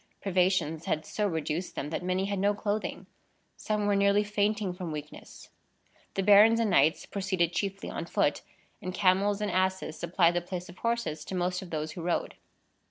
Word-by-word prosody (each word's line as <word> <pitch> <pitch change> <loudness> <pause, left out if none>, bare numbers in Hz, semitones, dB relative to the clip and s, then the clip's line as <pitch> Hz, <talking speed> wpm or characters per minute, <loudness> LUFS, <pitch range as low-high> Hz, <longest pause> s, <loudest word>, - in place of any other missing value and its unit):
Privations 180 -4 +1
had 155 - -1
so 210 -1 -1
reduced 160 0 -3
them, 150 - -4
that - - -2
many 185 +1 0
had 200 -1 -2
no 205 +1 +2
clothing. 210 +1 -3 0.5
Some 210 -1 -2
were 205 0 +2
nearly 200 +1 +3
fainting 210 -1 0
from 180 -2 -6
weakness. 150 0 -9 0.7
The 195 - 0
barons 210 +3 +7
and 225 -3 +1
knights 160 0 +3
proceeded 185 -4 -1
chiefly 195 +2 -3
on - - -5
foot, - - +1 0.4
and 185 0 -5
camels 195 +2 +2
and 210 -2 -1
asses 185 -3 -1
supplied 170 0 +3
the 175 - 0
place 180 0 -6
of 175 - -13
horses 230 -10 -1
to 190 - -5
most 180 0 -1
of 185 - -9
those 155 -1 -3
who 170 - -7
rode. 175 +1 -1
185 Hz, 180 wpm, -29 LUFS, 175-205 Hz, 0.7 s, barons